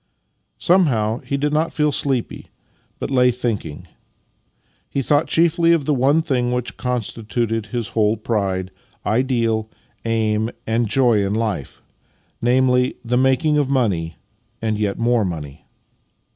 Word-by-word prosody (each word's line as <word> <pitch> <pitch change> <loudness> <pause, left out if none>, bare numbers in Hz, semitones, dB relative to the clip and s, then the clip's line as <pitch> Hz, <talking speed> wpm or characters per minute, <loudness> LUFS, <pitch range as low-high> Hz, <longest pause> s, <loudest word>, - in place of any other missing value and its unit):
Somehow 125 - +2
he 140 - -3
did 145 +1 -1
not 155 +2 +1
feel 150 -1 +1
sleepy, 135 -3 -2 0.5
but - - -5
lay 125 -1 +4
thinking. 115 -11 -3 1.0
He 135 - -1
thought 145 +4 +2
chiefly 170 0 +3
of 160 -5 +1
the 150 - +2
one 140 +5 +3
thing 125 -5 0
which 125 -1 -2
constituted 115 -2 -2
his 120 -1 -3
whole 110 0 +1
pride, 95 -4 -2 0.3
ideal, 115 -1 0 0.3
aim 110 -1 0 0.2
and 115 0 0
joy 120 -5 +3
in 100 +1 -1
life 110 -11 -3 0.3
— - - -41
namely, 125 +1 +2
the 120 +1 0
making 130 +4 +3
of 140 -2 0
money, 95 - 0 0.4
and 110 -1 -1
yet 100 -2 -1
more 120 -1 +2
money. 75 -5 -6
120 Hz, 135 wpm, -20 LUFS, 110-135 Hz, 1.0 s, lay